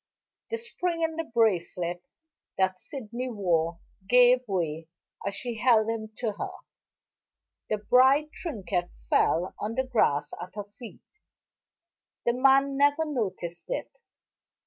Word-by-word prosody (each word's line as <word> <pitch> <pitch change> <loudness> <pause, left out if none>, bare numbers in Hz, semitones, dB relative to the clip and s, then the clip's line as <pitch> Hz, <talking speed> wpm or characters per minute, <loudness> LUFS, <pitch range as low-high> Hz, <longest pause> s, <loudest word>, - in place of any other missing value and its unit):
The 460 - -2
spring 360 -7 -2
in 320 0 0
the 330 - -2
bracelet 180 - 0 0.6
that 185 -1 +1
Sydney 250 -1 -5
wore 170 -6 0 0.3
gave 245 0 +7
way 165 -5 -2 0.4
as 200 - -2
she 240 0 -4
held 225 -3 +4
him 220 -1 -4
to 230 -3 -1
her; - - -2 1.2
the 215 - +1
bright 265 +8 +4
trinket 190 - -3 0.2
fell 175 +3 +2
on 215 +2 -3
the 260 - +1
grass 150 - +1
at 180 +2 -9
her 205 - -4
feet. 210 +3 -12 1.2
The 240 - +3
man 270 +2 +4
never 285 +3 +3
noticed 185 - -3
it. - - -4
225 Hz, 125 wpm, -28 LUFS, 185-265 Hz, 1.2 s, gave